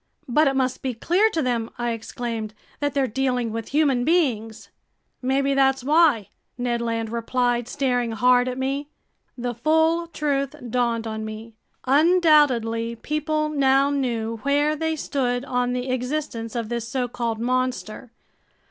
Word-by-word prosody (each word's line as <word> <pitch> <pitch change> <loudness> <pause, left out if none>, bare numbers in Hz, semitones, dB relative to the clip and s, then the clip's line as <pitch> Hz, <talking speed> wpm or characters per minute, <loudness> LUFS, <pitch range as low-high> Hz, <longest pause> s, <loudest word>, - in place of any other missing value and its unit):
"But 300 +5 +3
it 270 - +1
must 260 -1 0
be 255 -3 -3
clear 365 - +2
to 325 -7 -1
them," 235 -3 -1
I 240 0 -1
exclaimed, 225 -1 -5 0.2
"that 290 -1 -1
they're 275 -1 +2
dealing 250 -1 -1
with 225 0 -4
human 280 -4 +2
beings." 235 -9 0 0.5
"Maybe 275 +2 +1
that's 270 -1 +2
why!" 295 - +3 0.3
Ned 240 -1 -1
Land 230 -1 -2
replied, 240 0 0
staring 245 -3 0
hard 250 +2 +4
at 255 0 -3
me. 275 +2 -2 0.5
The 245 0 -3
full 320 +6 +2
truth 285 -3 -1 0.2
dawned 235 -2 0
on 220 -1 -4
me. 220 +1 -8 0.3
Undoubtedly 275 -7 +3
people 305 +4 -1
now 275 -1 +3
knew 230 -5 -1
where 290 +5 +1
they 320 +1 -1
stood 255 -4 -1
on 250 -2 0
the 250 +1 -2
existence 250 -3 -3
of 230 -2 -3
this 235 -1 -3
so 250 0 -1
called 235 -2 -3
monster. 250 -1 -2
250 Hz, 150 wpm, -23 LUFS, 235-285 Hz, 0.5 s, hard